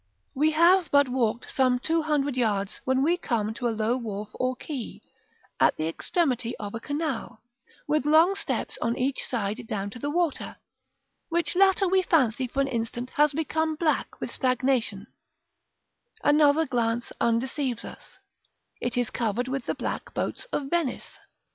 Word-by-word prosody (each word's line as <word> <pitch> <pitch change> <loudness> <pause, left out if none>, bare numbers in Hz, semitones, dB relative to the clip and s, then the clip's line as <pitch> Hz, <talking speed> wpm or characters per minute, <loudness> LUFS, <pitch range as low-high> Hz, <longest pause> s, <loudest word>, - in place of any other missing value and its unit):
§ - - -48
X. - - -46 0.3
We 300 +3 +3
have 340 +1 +5
but 285 -1 +5
walked 240 -2 -1
some 260 -4 +3
two 325 +6 0
hundred 290 -3 0
yards 205 -5 -1
when 260 +1 +2
we 340 +4 +3
come 220 - -1
to 240 +2 -2
a - - +1
low 225 +2 0
wharf 210 -4 -5
or 255 0 -1
quay, 265 -3 -6 0.6
at - - +4
the 155 - -1
extremity 250 - -1
of 205 -1 -6
a 230 - -4
canal, 285 -5 -4 0.4
with 300 -1 +1
long 320 +5 +6
steps 395 - -3
on 235 - 0
each 265 +2 0
side 225 0 -2
down 200 -1 -3
to 245 - -9
the 290 - -2
water, 335 0 -1 0.7
which 330 -3 0
latter 385 +1 +4
we 380 +1 +3
fancy 260 -8 +2
for 275 +3 -1
an 275 - +1
instant 240 0 -3
has 295 0 +3
become 315 +1 -1
black 310 -1 -1
with - - -4
stagnation; 255 -6 0 1.2
another 295 +1 +5
glance 235 -3 -1
undeceives 240 +2 0
us, - - -12 0.6
it 245 0 -2
is 245 -2 0
covered 235 +1 -1
with 265 -1 -3
the - - -1
black - - -5
boats - - -2
of 290 - -3
Venice. 335 -7 -2
260 Hz, 165 wpm, -26 LUFS, 235-305 Hz, 1.2 s, long